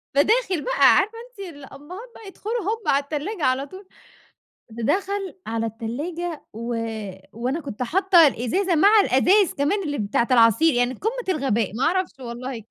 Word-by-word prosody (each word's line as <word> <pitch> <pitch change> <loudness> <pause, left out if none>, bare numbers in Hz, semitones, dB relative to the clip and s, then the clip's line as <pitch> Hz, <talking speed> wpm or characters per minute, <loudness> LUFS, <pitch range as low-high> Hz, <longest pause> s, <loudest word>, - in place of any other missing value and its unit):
فداخل 380 - +2
بقى - - +5
عارفة 435 +3 +1
أنتِ 395 -7 -9
الأبهات 295 - -11
بقى 435 - -12
يدخلوا 440 +4 -4
هُم 435 +3 -3
على 280 +1 +3
التلاجة 310 +6 -4
على 260 +2 +1
طول. 375 +5 -13 0.8
د 225 0 -5
دخل 390 0 -2
على 225 0 -2
التلاجة 290 +10 -5
و 235 +2 -4 0.6
وأنا 250 +7 -2
كنت 260 -5 -5
حاطة 355 - +5
الإزازة 335 - 0
مع 405 +7 +6
الأزايز 375 +4 +3
كمان 310 +8 0
اللي 290 -3 -3
بتاعة 215 +3 0
العصير 245 +6 +5
يعني 245 +1 +1
قمة 455 - -4
الغباء 235 -7 0
ما 250 - -1
أعرفش 360 -4 0
والله. 240 -1 -6
300 Hz, 155 wpm, -23 LUFS, 245-390 Hz, 0.8 s, مع